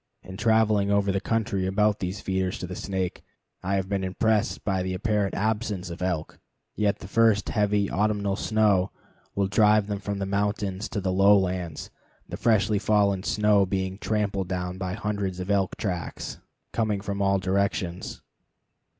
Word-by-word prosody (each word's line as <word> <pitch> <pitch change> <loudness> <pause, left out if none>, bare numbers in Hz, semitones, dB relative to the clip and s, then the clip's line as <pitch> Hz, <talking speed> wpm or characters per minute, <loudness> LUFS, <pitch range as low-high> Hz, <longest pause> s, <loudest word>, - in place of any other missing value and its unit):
In 95 - -9
traveling 110 -1 +3
over 100 -1 +2
the 95 0 -1
country 100 -4 0
about 105 +2 +2
these 95 +1 -4
feeders 95 -1 -1
to - - -5
the 90 +1 -6
Snake, 95 -2 -3 0.4
I 95 +2 -1
have 95 -1 -1
been 100 -1 -1
impressed 105 +3 0
by 95 -2 +1
the 95 0 -2
apparent 105 0 0
absence 105 -3 -1
of 85 - -8
elk, 90 -4 -2 0.4
yet 105 -1 +1
the - - -10
first 110 -1 +3
heavy 105 -2 +1
autumnal 100 0 0
snow 105 -3 +2 0.5
will 100 - +2
drive 105 +1 +4
them 100 -1 -3
from 100 +1 -4
the 100 - -2
mountains 100 0 -1
to 100 - -3
the 95 -1 -1
lowlands, 95 -4 +2 0.4
the - - -6
freshly 110 -2 +2
fallen 100 -3 +2
snow 105 0 +3
being 95 0 -2
tramped 100 -4 -1
down 90 0 -3
by 90 -1 -3
hundreds 105 -4 -3
of 90 +2 -3
elk 95 -2 +1
tracks 90 -5 -4 0.3
coming 110 -3 0
from 100 0 -3
all 100 0 +3
directions. 95 -2 -2
100 Hz, 165 wpm, -26 LUFS, 95-105 Hz, 0.5 s, drive